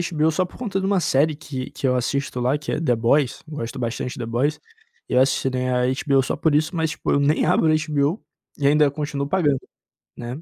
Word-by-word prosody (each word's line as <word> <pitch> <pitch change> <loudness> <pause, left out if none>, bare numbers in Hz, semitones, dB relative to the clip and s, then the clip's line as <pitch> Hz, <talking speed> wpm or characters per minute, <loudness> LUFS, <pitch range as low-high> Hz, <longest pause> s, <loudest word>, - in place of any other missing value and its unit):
HBO 155 +1 +3
só 185 +4 0
por 180 - -14
conta 205 -6 -2
de 190 - -2
uma 195 -1 +2
série 150 0 +2
que 135 -4 -6
que 135 - -2
eu 125 - +2
assisto 125 +1 -1
lá, 125 +4 +1
que 150 - -5
é - - -1
The 135 -7 +2
Boys, 125 +4 +1
gosto 145 -7 -6
bastante 120 +1 -3
The 115 - -4
Boys. 130 +6 0 0.5
Eu 125 - +2
assinei 130 -1 +1
a 125 0 +1 0.2
HBO 135 -2 +4
só - - -2
por 155 -1 +1
isso, 155 +4 +1
mas 160 -1 0
tipo, - - -3
eu - - +3
nem 145 +2 +2
abro - - +3
o - - +3
HBO 155 +3 0 0.4
e 140 - +2
ainda 150 0 +4
continuo 145 -1 -3
pagando, 150 -6 +1 0.6
né? 125 +5 -6
145 Hz, 225 wpm, -22 LUFS, 130-155 Hz, 0.6 s, HBO